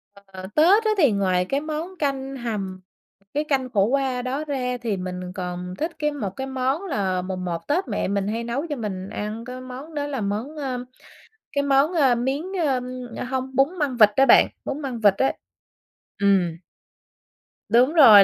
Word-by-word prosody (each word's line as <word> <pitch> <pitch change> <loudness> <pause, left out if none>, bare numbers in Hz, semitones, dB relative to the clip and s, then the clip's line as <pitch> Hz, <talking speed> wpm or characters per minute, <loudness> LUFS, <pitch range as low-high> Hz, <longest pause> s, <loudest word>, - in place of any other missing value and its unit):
Ờ, 195 -2 -10
Tết 375 +9 +5
á 435 - +3
thì 285 - +5
ngoài 185 -2 +2
cái 275 +9 -1
món 315 +4 -5
canh 275 -2 -2
hầm, 200 -6 -4 0.5
cái 295 +1 +1
canh 270 -4 0
khổ 200 -5 +3
qua 260 +1 0
đó 265 +4 -2
ra 255 -4 -2
thì 220 -4 -1
mình 180 -1 -5
còn 180 0 -5
thích 320 +3 -1
cái 300 0 +1
một 210 -10 -3
cái 265 - -3
món 265 +6 -1
là 190 - -1
mùng 185 0 -4
1 170 -2 -4
Tết 300 +1 +1
mẹ 205 - -1
mình 200 0 0
hay 225 +2 -2
nấu 265 +7 -2
cho 295 - -1
mình 195 -5 -4
ăn 215 +2 -4
cái 255 +1 -7
món 255 +5 -9
đó 290 -1 -1
là 275 -4 -3
món, 215 +9 -3
ơ, 255 -4 -3 0.7
cái 285 -1 0
món, 280 +4 +3
ơ, 275 -7 +4
miến 265 +5 -1 0.2
ơ, 265 -3 +2 0.5
hông 260 0 -3
bún 280 +8 +2
măng 275 -4 0
vịt 215 -3 +8
á 270 - +5
bạn, - - +7 0.2
bún 295 - -3
măng 255 -4 -4
vịt 205 -3 +5
á. 265 - +2 0.9
Ừm. 190 -5 +3 1.1
Đúng 245 +7 +4
rồi, 220 -11 +9
255 Hz, 190 wpm, -24 LUFS, 200-280 Hz, 1.1 s, rồi